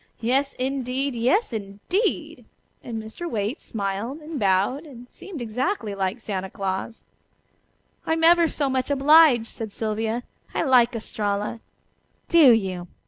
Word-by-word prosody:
Yes, 270 +4 +1
indeed! 265 +1 -2
Yes, 250 - +1
indeed!" 210 - -2 0.4
and 230 -2 -5
Mr. 220 +11 -7
Waite 220 +5 -2
smiled 205 +5 -3
and 305 -1 -6
bowed, 200 - +1
and 245 -3 -12
seemed 325 -1 -9
exactly 235 - -2
like 195 +3 -2
Santa 190 -4 -4
Claus. 195 +4 -4 1.0
"I'm 325 0 0
ever 340 0 +6
so 290 -2 -1
much 260 0 -1
obliged," 285 -3 +6
said 225 -1 -7
Sylvia. 220 +2 -2 0.3
"I - - +1
like 250 -4 +4
Estralla." 210 -1 -3 0.7
"Do 320 -7 +7
you? 190 -5 0
240 Hz, 130 wpm, -24 LUFS, 210-280 Hz, 1.0 s, Do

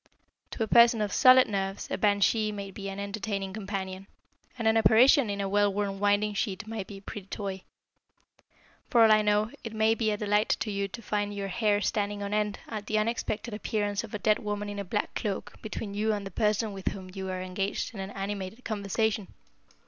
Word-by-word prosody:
To 225 - -2
a - - -2
person 235 0 +6
of 210 -1 -1
solid 255 0 +7
nerves 195 -1 -3
a - - +1
banshee 210 +1 +2
may 200 -1 -6
be 195 0 -6
an 195 0 -6
entertaining 200 -1 -3
companion, 195 -2 -5 0.5
and 230 -2 -1
an 220 - +4
apparition 235 +3 +6
in 200 0 -3
a 200 - -1
well 205 +1 +3
worn 195 -1 -2
winding 205 +1 +2
sheet 200 -1 -2
may 220 -2 -4
be 195 +1 -10
a - - -12
pretty 200 -1 -8
toy. 195 -2 -5 1.3
For 235 -3 +6
all 220 - +6
I 215 0 +6
know, 210 +1 +2
it 225 - -6
may 220 0 +3
be 225 -1 0
a 210 - 0
delight 210 +1 +1
to 215 - -1
you 200 0 -1
to 230 +4 -9
find 205 -1 -2
your 200 -1 -3
hair 205 +1 +1
standing 205 -1 -1
on 200 +1 -3
end 210 -1 0
at 210 -2 -6
the 215 - +1
unexpected 220 0 -2
appearance 205 -1 -1
of 215 -2 -7
a - - 0
dead 215 +1 +2
woman 205 -1 -3
in 205 0 -5
a - - -2
black 205 +3 -2
cloak 210 -1 -3
between 215 -1 -5
you 215 +2 +1
and 205 -1 -3
the 195 - -6
person 210 +2 0
with 195 -1 -8
whom 185 -2 -3
you 190 -1 -5
are 185 0 -3
engaged 195 +5 -3
in 205 - -8
animated 195 +3 -5
conversation. 210 0 -1
205 Hz, 210 wpm, -28 LUFS, 195-215 Hz, 1.3 s, solid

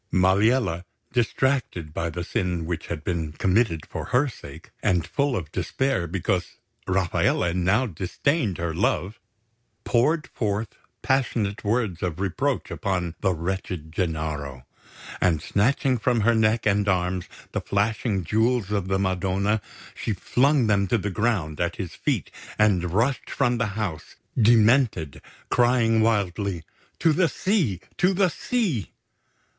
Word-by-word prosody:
Maliella, 95 0 +3 0.3
distracted 120 - 0
by 85 +1 -2
the 85 +2 -4
sin 90 -2 -2
which 85 -1 -4
had 80 -2 -5
been 80 -3 -2
committed 95 -2 +1
for - - -6
her 130 +4 +2
sake, 125 - -11
and 90 -3 +2
full 140 -2 0
of 85 -8 -4
despair 135 -10 -1
because 90 -1 -2 0.3
Rafaele 90 -2 +1
now 95 +8 +2
disdained 105 - -1
her 85 -1 -2
love, 95 +3 0 0.6
poured 150 +7 +2
forth 105 -1 -1 0.3
passionate 115 -6 0
words 105 -5 0
of 90 -3 -2
reproach 115 +9 -1
upon 90 -5 -2
the 95 - +2
wretched 85 -2 -4
Gennaro; 75 -6 -3 0.6
and 85 -4 +3
snatching 125 - +1
from 120 +1 +1
her 115 +3 +4
neck 110 0 +2
and 100 -1 +2
arms 90 -1 0 0.3
the - - -2
flashing 105 -1 0
Jewels 110 +2 +1
of 100 -3 -1
the 95 0 +1
Madonna, 95 +2 0 0.3
she 110 - -3
flung 135 - +2
them 100 -2 +2
to 120 - +2
the 105 -1 -3
ground 95 -8 -1
at - - 0
his - - -5
feet - - -2 0.3
and 95 -5 +3
rushed 120 +8 0
from 125 -3 +1
the 115 - +1
house, 95 -8 -4 0.2
demented, 115 - +3 0.3
crying 120 -2 +3
wildly: 100 -5 0 0.3
"To 160 - +3
the 170 0 +3
sea! 145 - 0 0.2
To 185 +1 +3
the 190 -1 +3
sea!" 180 - -1
100 Hz, 140 wpm, -25 LUFS, 90-120 Hz, 0.6 s, her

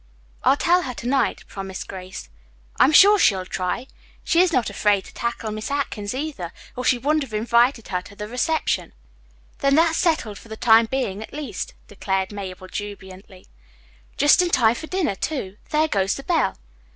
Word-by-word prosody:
"I'll 275 - +4
tell 355 +3 +3
her 255 -7 -5
to 235 - -6
night," 270 +1 +1
promised 195 -1 -7
Grace. 185 -1 -8 0.5
"I'm 275 - +6
sure 405 +6 +7
she'll 190 - +3
try. 185 +7 -3 0.4
She 340 - +3
is 365 -1 +3
not 250 -7 +1
afraid 205 -2 +1
to - - -13
tackle 235 -2 -3
Miss 215 0 -5
Atkins, 255 -6 -3
either, 265 - -4 0.2
or 250 - -4
she 255 - +3
wouldn't 300 +5 +1
have 260 -6 -5
invited 235 +2 +2
her 180 -1 -1
to 200 - -14
the 210 +1 -6
reception." 280 +7 -1 0.7
"Then 275 0 +3
that's 325 +1 +3
settled 260 - 0
for - - -16
the 220 - -7
time 225 0 +5
being 220 -6 -2
at 220 - -9
least," 275 -10 -5
declared 190 -1 -2
Mabel 185 -2 -7
jubilantly. 190 -2 -9 0.7
"Just 290 +6 +5
in 355 - +1
time 230 -8 +4
for 315 +6 -7
dinner, 370 - 0
too. 205 -4 -4
There 310 +1 +2
goes 195 -7 0
the 275 - -8
bell." 345 0 +1
235 Hz, 180 wpm, -23 LUFS, 200-290 Hz, 0.7 s, sure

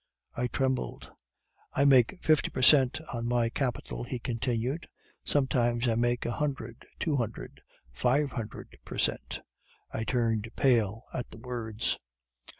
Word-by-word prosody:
"I 125 +1 0
trembled. 130 0 -2 0.6
"'I 140 - +4
make 135 +5 +5
fifty 155 -2 +4
per 130 - -3
cent 135 -1 +6
on 120 0 -2
my 120 -1 +2
capital,' 125 -1 -2
he 125 +1 -4
continued, 120 +5 -2 0.4
'sometimes 120 -3 +2
I 115 - +3
make 120 +1 +1
a 120 - 0
hundred, 125 -4 -3
two 155 -4 0
hundred, 115 -3 -4 0.3
five 130 - +2
hundred 110 -3 -7
per - - -7
cent.' - - -1 0.5
"I 110 - -2
turned 115 -2 0
pale 115 -4 +2
at 125 - -4
the - - -11
words. 115 -2 -2
120 Hz, 140 wpm, -30 LUFS, 115-130 Hz, 0.6 s, cent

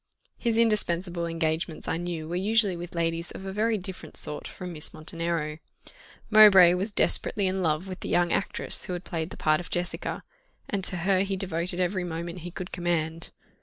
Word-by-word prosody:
His 230 -2 -1
indispensable 180 -6 +1
engagements 160 -1 -2
I - - 0
knew 170 -2 -4
were 170 - -4
usually 205 +1 +2
with 175 +1 -8
ladies 165 0 -1
of 190 - -8
a 190 - -5
very 220 +2 +1
different 185 -5 -6
sort 150 - +3
from 180 -2 -7
Miss 155 -1 -1
Montenero. 160 -1 -3 0.7
Mowbray 195 -5 +9
was 190 +4 0
desperately 205 0 +2
in 190 0 0
love 160 +2 0
with 185 -1 -7
the - - -6
young 175 -1 +2
actress - - -1
who 180 - -4
had 175 0 -5
played 165 -2 -4
the - - -10
part 155 0 +2
of 175 - -7
Jessica, 175 +1 -3 0.4
and 200 -2 -2
to 180 - +1
her 195 -1 +3
he 195 0 0
devoted 180 -1 -1
every 185 +1 0
moment 170 +1 -5
he 175 +1 -7
could 180 +1 -7
command. 165 -2 -2
175 Hz, 190 wpm, -27 LUFS, 165-190 Hz, 0.7 s, Mowbray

